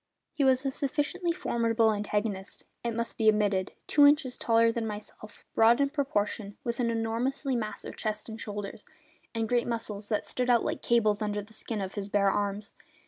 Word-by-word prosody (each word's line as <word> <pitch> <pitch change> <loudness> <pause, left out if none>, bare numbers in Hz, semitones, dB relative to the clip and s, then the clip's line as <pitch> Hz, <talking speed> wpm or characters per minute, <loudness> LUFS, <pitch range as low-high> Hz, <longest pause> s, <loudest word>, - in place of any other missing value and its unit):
He 295 - 0
was 260 0 +3
a 270 - +1
sufficiently 295 +6 -1
formidable 230 -10 +1
antagonist, 205 -1 -3 0.2
it 235 -1 -2
must 235 +1 -3
be 220 -1 +6
admitted; 205 -3 +1
two 290 -1 +6
inches 285 -3 +3
taller 230 0 +3
than 230 -1 -2
myself, 210 0 -9
broad 230 +3 +5
in 280 0 +2
proportion, 210 -8 -1
with 235 0 -3
an 240 -1 +1
enormously 235 +4 -1
massive 215 -3 -4
chest 215 -1 -3
and 225 0 -7
shoulders, 205 -1 -6 0.5
and 225 -1 0
great 240 +1 +1
muscles 215 -3 -3
that 210 - 0
stood 250 0 -2
out 240 -2 +5
like - - -2
cables 215 -3 +2
under 210 -1 -1
the 215 +2 -14
skin 215 -1 -3
of 190 -1 -4
his 205 -1 -4
bare 200 -1 +3
arms. 205 +1 -2
225 Hz, 185 wpm, -29 LUFS, 210-245 Hz, 0.5 s, be